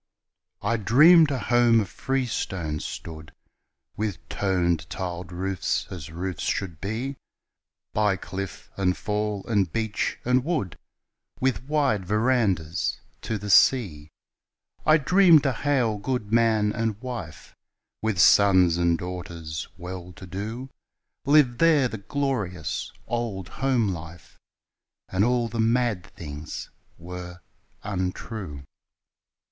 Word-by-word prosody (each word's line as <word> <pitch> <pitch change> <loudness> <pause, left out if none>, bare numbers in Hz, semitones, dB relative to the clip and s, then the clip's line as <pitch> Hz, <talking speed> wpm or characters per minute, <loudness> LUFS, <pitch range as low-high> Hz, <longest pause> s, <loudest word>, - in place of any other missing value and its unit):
I 115 - +1
dreamed 150 - +6
a 140 - -1
home 120 0 +4
of 100 - -3
freestone 95 - -2
stood 80 0 -7 0.6
With 105 -3 -4
toned 85 -5 0
tiled 90 -1 -5
roofs 95 +1 -1
as 85 -5 -7
roofs 90 0 -4
should 85 -5 -2
be, 120 +7 -3 0.8
By 105 -2 +2
cliff 95 -1 -7
and 90 -2 +1
fall 105 -2 -2
and 100 -7 +1
beach 110 +1 -1
and 125 +1 +3
wood 135 - -2 0.6
With 130 -1 0
wide 140 -9 +1
verandahs 105 -7 +1 0.2
to 110 - -2
the 105 0 -3
sea. 90 - +4 0.8
I 155 0 +7
dreamed 170 0 +5
a 135 - +2
hale 120 -5 0
gudeman 110 -2 +1
and 115 -3 -2
wife, 110 - -7 0.5
With 110 -3 -1
sons 95 -2 +6
and 85 -1 +2
daughters 85 -3 -6
well 90 0 -7
to 95 - -11
do, 110 +8 -6 0.5
Lived 140 -4 +4
there 155 -5 +5
the 115 -3 -6
glorious 105 - -2
old 110 -6 -3
home 130 -6 +1
life 80 -3 -8 0.7
And 95 +2 +1
all 120 0 +2
the 115 0 -5
mad 115 -4 +2
things 75 -1 -8 0.3
were 90 0 -8 0.4
untrue. 95 -5 -4
105 Hz, 115 wpm, -25 LUFS, 90-120 Hz, 0.8 s, I